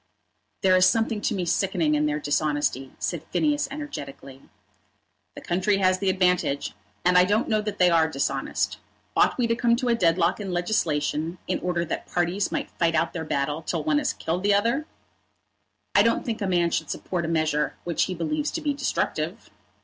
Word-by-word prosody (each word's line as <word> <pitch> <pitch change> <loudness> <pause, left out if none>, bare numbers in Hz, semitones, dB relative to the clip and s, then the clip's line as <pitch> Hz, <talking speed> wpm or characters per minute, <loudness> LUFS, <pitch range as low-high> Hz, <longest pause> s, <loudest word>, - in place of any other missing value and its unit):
"There 185 -1 +4
is 185 0 +6
something 225 -1 +1
to 215 - 0
me 185 -2 -2
sickening 170 -3 +1
in 150 0 +2
their 150 0 -1
dishonesty," 145 -3 -1
said - - -3
Phineas 295 -2 +1
energetically. 140 - -8 0.9
"The - - -8
country 190 +3 +1
has 185 -1 +2
the 195 0 +1
advantage; 180 -6 +1 0.3
and 180 0 +6
I - - +7
don't 205 +5 +1
know 215 -1 +1
that 210 -1 -4
they 180 -1 +4
are 160 -1 +4
dishonest. 140 -3 -2 0.4
Ought - - +3
we 245 - +2
to 230 0 +1
come 235 0 +3
to 250 0 -1
a - - +4
deadlock 175 -3 +2
in 195 -3 -4
legislation 165 -3 -1
in - - -1
order 175 -1 -1
that 165 - -4
parties 175 +3 0
might - - -3
fight 165 -1 +2
out 165 +1 +1
their 165 - -4
battle 145 +1 -1
till - - -3
one 305 -2 +2
had 290 -2 0
killed 170 +3 -2
the 200 +1 +3
other?" 235 +9 +1 1.1
"I 200 - +6
don't 230 +2 +2
think 230 -2 -3
a 200 - 0
man 175 -2 +2
should 160 - -1
support 175 -2 -3
a - - -2
measure 155 -2 0
which 170 -2 0
he 185 - -4
believes 300 - -1
to 325 - -3
be 295 -2 0
destructive." 280 0 -2
180 Hz, 195 wpm, -25 LUFS, 160-220 Hz, 1.1 s, I